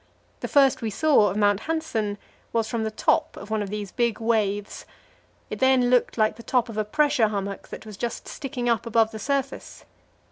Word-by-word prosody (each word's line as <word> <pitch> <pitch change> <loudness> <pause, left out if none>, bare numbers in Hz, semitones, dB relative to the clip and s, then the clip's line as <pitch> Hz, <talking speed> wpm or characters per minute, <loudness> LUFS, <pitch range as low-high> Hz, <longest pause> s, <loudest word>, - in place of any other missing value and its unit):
The - - -4
first 275 -2 +4
we 225 - -1
saw 275 -1 +4
of 190 - -4
Mount 205 -1 +3
Hanssen 235 -11 -2 0.4
was 225 -1 +1
from 225 0 -2
the 220 - -1
top 215 - 0
of 205 - -9
one 220 -1 0
of 200 - -4
these 205 -2 -5
big 235 -3 0
waves; 210 -3 -1 0.6
it - - -4
then 260 -2 +4
looked 250 -1 +2
like 215 -1 +2
the - - -9
top 245 0 0
of 220 - -7
a - - +2
pressure 285 +1 +2
hummock 200 -1 -4
that - - -9
was 210 -3 -9
just 235 +2 -4
sticking 265 -4 -4
up 235 -1 +1
above 225 -1 +3
the 220 - -7
surface. 275 +2 -3
225 Hz, 205 wpm, -25 LUFS, 210-255 Hz, 0.6 s, first